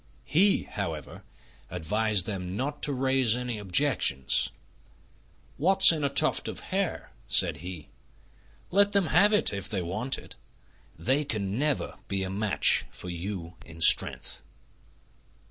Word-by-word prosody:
He, 195 +6 +3
however, 80 -8 -6 0.5
advised 100 +3 0
them 95 -3 -4
not 145 +3 -3
to 145 - 0
raise 130 -3 +2
any 125 -3 -4
objections. 100 - +1 1.1
"What's 190 +4 +6
in 155 -3 -2
a 140 - +1
tuft 150 +3 +2
of - - -6
hair?" 195 -2 -2 0.2
said - - +2
he. 85 -2 -8 0.8
"Let 200 +2 +3
them 200 -2 +3
have 205 +1 +5
it 210 - +3
if 100 -1 -5
they 95 -4 -2
want 110 +10 -1
it. - - -12 0.6
They 130 - 0
can 105 -5 -3
never 150 -2 -1
be 95 -1 -2
a 95 - -4
match 105 +1 +2
for 90 - -9
you 85 0 -6
in 80 0 -13
strength." - - +2
110 Hz, 135 wpm, -27 LUFS, 90-145 Hz, 1.1 s, What's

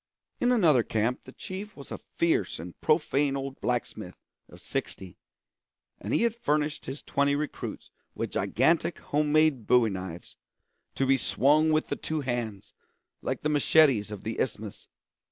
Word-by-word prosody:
In 245 - +3
another 165 - +5
camp 115 +2 -1
the 130 - -10
chief 195 +8 -8
was 140 - -10
a - - -5
fierce 165 - 0
and 85 +2 -8
profane 145 -3 +2
old 135 0 -6
blacksmith 120 -2 -3 0.3
of - - -14
sixty, 95 -3 -4 0.8
and - - -5
he - - +2
had 235 -2 +2
furnished 150 -11 -1
his 135 +3 -6
twenty 140 0 +1
recruits 150 +1 -5 0.2
with - - -3
gigantic 160 +7 +1
home 150 0 -1
made 155 -7 +3
bowie 120 -3 +4
knives, 95 -2 -7 0.6
to 135 - +1
be 135 0 +4
swung 150 +5 +3
with 155 0 +1
the - - 0
two 155 -1 -3
hands, 120 -6 -4 0.5
like - - -3
the 150 - +1
machetes 145 -7 +4
of 105 -3 -7
the 110 - -4
Isthmus. 110 -4 -4
140 Hz, 155 wpm, -28 LUFS, 115-155 Hz, 0.8 s, another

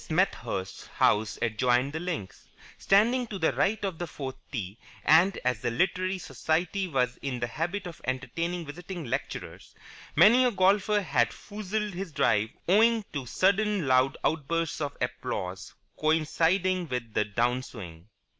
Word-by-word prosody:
Smethurst's 120 - -1
house 105 0 +2
adjoined 125 +4 +1
the 160 - -2
links, 160 - -5 0.3
standing 235 +5 +3
to 210 - -5
the 160 -3 +1
right 205 0 +1
of 185 -5 -4
the 175 - -3
fourth 135 -4 -6 0.2
tee: 105 -4 -5 0.3
and, 170 +6 +5
as 125 -4 0
the 120 - 0
Literary 185 +8 0
Society 175 +5 -1
was 125 -6 0
in 130 -3 -4
the 120 - 0
habit 175 - -3
of 175 -3 -8
entertaining 165 +7 -2
visiting 175 +2 -7
lecturers, 120 - -5 0.4
many 240 +5 +7
a 250 - +4
golfer 205 +1 +3
had 125 - +2
foozled 210 - -4
his 185 -1 -5
drive 110 -6 +2 0.2
owing 220 +3 +4
to 135 -4 -4
sudden 200 - +2
loud 130 +1 +3
outbursts 165 +1 -1
of 145 -1 -3
applause 125 -7 -4 0.2
coinciding 165 +4 +1
with 125 -5 -4
his 105 - +2
down 125 +2 +2
swing. 90 -9 -10
160 Hz, 145 wpm, -28 LUFS, 125-190 Hz, 0.4 s, many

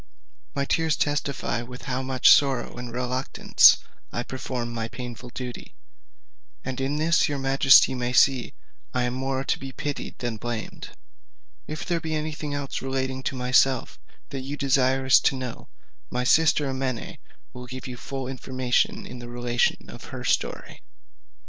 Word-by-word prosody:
My 140 0 0
tears 160 +1 +1
testify 145 -4 -1
with 125 +1 -10
how 130 -1 -2
much 130 -1 +4
sorrow 135 -4 +3
and 120 -1 -6
reluctance 125 +2 +4 0.3
I 120 - -2
perform 125 -2 -4
this 115 -1 -3
painful 125 -1 -7
duty; 125 0 -7 0.9
and 130 0 -3
in 135 +2 -1
this 160 +1 +3
your 145 - -2
majesty 135 0 +6
may 125 -1 -2
see 130 -1 +3 0.4
I 125 - +2
am 125 0 -1
more 135 +1 -2
to - - -1
be 135 0 -7
pitied 145 +1 -5
than 120 -3 -3
blamed. 115 0 -5 0.8
If 155 +1 -5
there 170 -2 0
be 160 -1 -3
any 155 +1 -2
thing 150 -1 -5
else 140 -1 -4
relating 130 0 -2
to 135 - -3
myself 125 0 +2 0.3
that 135 - -5
you 140 +3 -5
desire 135 -1 +2
to 135 +1 +5
know, 130 -2 -6 0.4
my 125 0 -1
sister 155 +2 +4
Amene 130 -3 -3 0.3
will 125 0 -9
give 130 +1 -8
you 125 - -6
full 135 +1 -5
information 130 -1 -1
in 125 - -8
the 120 0 -8
relation 120 0 0
of - - -10
her - - -7
story. - - -2
130 Hz, 160 wpm, -25 LUFS, 125-135 Hz, 0.9 s, majesty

